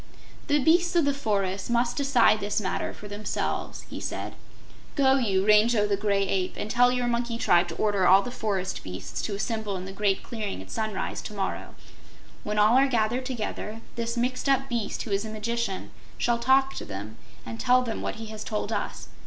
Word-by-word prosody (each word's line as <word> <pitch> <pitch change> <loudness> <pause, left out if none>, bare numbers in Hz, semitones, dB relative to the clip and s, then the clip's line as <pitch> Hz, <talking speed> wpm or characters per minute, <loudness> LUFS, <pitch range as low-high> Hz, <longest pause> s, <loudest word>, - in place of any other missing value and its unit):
"The 295 -2 +3
beasts 345 +5 +3
of 335 -4 +4
the 285 - +2
forest 200 -7 -1
must 235 0 +1
decide 260 -6 +4
this 205 +1 -1
matter 190 -3 -2
for 205 - -10
themselves," 205 +1 -3
he - - -8
said. - - -4 0.6
"Go 270 -2 +4
you, 195 -6 +1
Rango 210 +1 +5
the 205 -1 +1
Gray 200 -1 +1
Ape, 185 -1 -1
and 210 - -4
tell 245 +1 +5
your 250 -1 0
monkey 235 -1 -1
tribe 175 -5 +3
to 165 - -6
order 205 -3 +2
all 195 +2 +7
the 245 - -5
forest 195 -6 -2
beasts 90 0 -6
to 205 - -3
assemble 215 -1 -2
in 185 - -6
the 190 - -6
Great 195 0 0
Clearing 215 - -4
at 95 0 -10
sunrise 215 -2 -3
to 210 - -8
morrow. 195 -1 -3 0.7
When 210 0 -3
all 210 +3 +5
are 275 - +4
gathered 240 +1 0
together, 225 -3 -4
this 235 0 -3
mixed 255 +3 0
up 270 0 +2
Beast 235 -4 -2
who 220 - -7
is 200 +1 +1
a 220 - -6
magician 220 -2 -3 0.3
shall 240 -1 +1
talk 265 +2 +3
to - - -5
them 100 +3 -7 0.3
and 115 0 -7
tell 255 0 +4
them 225 -3 -4
what - - -3
he 225 - -7
has 215 - -6
told 210 - -3
us. - - -3
220 Hz, 200 wpm, -27 LUFS, 200-245 Hz, 0.7 s, all